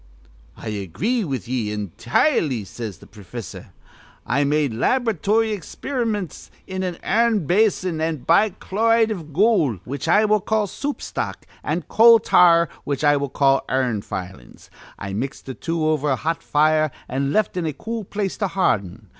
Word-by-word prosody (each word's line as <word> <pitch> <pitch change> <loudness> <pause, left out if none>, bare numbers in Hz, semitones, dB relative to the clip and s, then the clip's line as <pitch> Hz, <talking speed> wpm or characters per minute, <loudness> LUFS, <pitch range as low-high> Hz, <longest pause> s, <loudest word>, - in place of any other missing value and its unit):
'I - - -6
agree 110 - -2
with 135 - -4
ye 120 -4 -2
intirely,' 120 - 0
says 105 -2 -7
th' - - -18
profissor, 105 +2 -9 0.6
'I 140 +2 +1
made 145 -3 +1
lab'ratory 225 - +1
experiments 210 - -4 0.2
in 190 0 -4
an' 180 -2 -2
ir'n 220 -3 +2
basin, 185 -2 +1
with 160 -4 -2
bichloride 220 +4 +2
iv 165 -7 -6
gool, 170 - +2
which 140 +4 -5
I 205 +6 +4
will 210 -1 +2
call 215 +1 0
soup 285 +9 -5
stock, - - -4 0.2
an' 160 +3 -2
coal 230 +1 +7
tar, 170 -5 +5 0.2
which 145 0 -3
I 145 -1 +5
will 140 -1 -2
call 135 0 +2
ir'n 125 -5 0
filings. 90 -10 -8 0.3
I 100 0 -6
mixed 130 +7 -4
th' 130 - -8
two 165 -2 -1
over 150 -2 +1
a 135 - +2
hot 165 +5 -2
fire, 155 +1 +2 0.2
an' 135 +2 -1
left 215 +1 +1
in 175 -3 -1
a - - -1
cool 225 +9 -5
place 200 0 -3
to 200 - 0
harden. 105 - -1
160 Hz, 160 wpm, -22 LUFS, 130-210 Hz, 0.6 s, coal